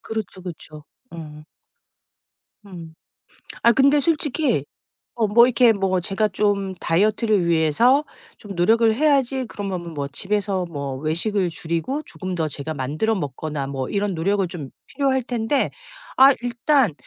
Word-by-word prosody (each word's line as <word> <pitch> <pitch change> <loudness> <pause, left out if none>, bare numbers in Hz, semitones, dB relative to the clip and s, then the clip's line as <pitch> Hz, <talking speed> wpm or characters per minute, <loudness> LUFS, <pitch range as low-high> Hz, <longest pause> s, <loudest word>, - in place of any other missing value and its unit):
그렇죠. 215 -4 -6
그쵸. 155 -4 -10 0.3
음. 150 -2 -9 1.2
음. 170 -5 -11 0.7
아 235 - +6
근데 280 +4 +4
솔직히 290 - 0 0.6
어 220 - +3
뭐 235 +4 +6
이렇게 240 -2 +4
뭐 190 -2 0
제가 195 +4 0
좀 200 -1 0
다이어트를 205 +2 +1
위해서 170 - +3 0.3
좀 205 -2 -9
노력을 225 +5 +3
해야지 270 -1 +1
그러면은 185 -6 -6
뭐 140 -1 -3
집에서 195 +4 -2
뭐 140 -3 -4
외식을 175 +6 -1
줄이고 170 - -3
조금 185 -2 -6
더 160 -2 -1
제가 150 +2 -5
만들어 150 +12 -1
먹거나 145 -2 -4
뭐 135 -2 -4
이런 200 -1 -1
노력을 190 +3 0
좀 155 -6 -7 0.2
필요할 265 -3 0
텐데 240 +3 0 0.5
아 270 +1 +8
일단 245 - +2
195 Hz, 275 characters per minute, -22 LUFS, 160-235 Hz, 1.2 s, 아